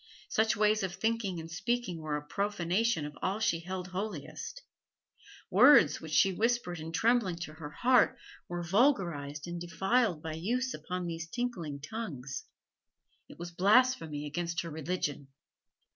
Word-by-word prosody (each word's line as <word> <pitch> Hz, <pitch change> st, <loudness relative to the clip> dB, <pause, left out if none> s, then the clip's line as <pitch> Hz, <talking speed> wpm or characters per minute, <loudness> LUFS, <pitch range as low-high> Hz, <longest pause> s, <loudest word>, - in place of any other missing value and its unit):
Such 220 Hz, -1 st, +2 dB
ways 215 Hz, 0 st, +3 dB
of 190 Hz, -2 st, -3 dB
thinking 225 Hz, -6 st, -1 dB
and 165 Hz, +1 st, -8 dB
speaking 220 Hz, -1 st, -2 dB
were 150 Hz, -1 st, -2 dB
a 150 Hz, -, -8 dB
profanation 200 Hz, 0 st, 0 dB
of 150 Hz, -1 st, -7 dB
all 195 Hz, +3 st, -1 dB
she 170 Hz, -6 st, +1 dB
held 180 Hz, +1 st, -5 dB
holiest; 195 Hz, -, -5 dB, 0.9 s
words 215 Hz, -, +7 dB
which 160 Hz, -, -8 dB
she 190 Hz, +4 st, +4 dB
whispered 225 Hz, -5 st, 0 dB
in 160 Hz, +1 st, -6 dB
trembling 220 Hz, 0 st, +2 dB
to 150 Hz, -, -5 dB
her 155 Hz, -2 st, -8 dB
heart 245 Hz, +10 st, +3 dB, 0.3 s
were 175 Hz, 0 st, -4 dB
vulgarised 170 Hz, -, +1 dB
and 175 Hz, 0 st, -5 dB
defiled 190 Hz, 0 st, +1 dB
by 160 Hz, -1 st, -4 dB
use 245 Hz, +11 st, -1 dB
upon 180 Hz, -1 st, -4 dB
these 165 Hz, -1 st, -5 dB
tinkling 180 Hz, -, -3 dB
tongues; 150 Hz, -, -5 dB, 0.8 s
it -, -, -12 dB
was 175 Hz, +1 st, -7 dB
blasphemy 190 Hz, -, +3 dB
against 170 Hz, +3 st, -2 dB
her 170 Hz, -, -7 dB
religion. 150 Hz, -3 st, -3 dB
180 Hz, 145 wpm, -31 LUFS, 160-220 Hz, 0.9 s, words